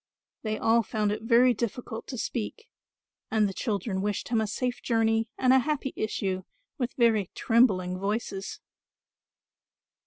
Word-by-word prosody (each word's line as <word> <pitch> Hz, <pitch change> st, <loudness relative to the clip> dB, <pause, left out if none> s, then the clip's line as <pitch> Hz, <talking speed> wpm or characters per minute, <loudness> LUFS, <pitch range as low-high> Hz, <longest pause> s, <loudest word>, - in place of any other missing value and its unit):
They 215 Hz, -1 st, -2 dB
all 230 Hz, +1 st, +3 dB
found 210 Hz, -1 st, -1 dB
it 210 Hz, -, -3 dB
very 240 Hz, +2 st, +5 dB
difficult 235 Hz, 0 st, -4 dB
to 255 Hz, -, -5 dB
speak 245 Hz, -, -4 dB, 0.6 s
and 215 Hz, -1 st, +3 dB
the 195 Hz, -, -4 dB
children 200 Hz, -3 st, -2 dB
wished 205 Hz, 0 st, -2 dB
him 230 Hz, -2 st, +2 dB
a 220 Hz, -, -1 dB
safe 250 Hz, +4 st, -2 dB
journey 225 Hz, -1 st, +1 dB
and 255 Hz, 0 st, +4 dB
a 265 Hz, -, +7 dB
happy 275 Hz, -1 st, -2 dB
issue 190 Hz, -3 st, -2 dB, 0.4 s
with 245 Hz, -1 st, -1 dB
very 225 Hz, -6 st, +3 dB
trembling 190 Hz, -6 st, +3 dB
voices. 195 Hz, -1 st, -3 dB
225 Hz, 145 wpm, -28 LUFS, 205-245 Hz, 0.6 s, a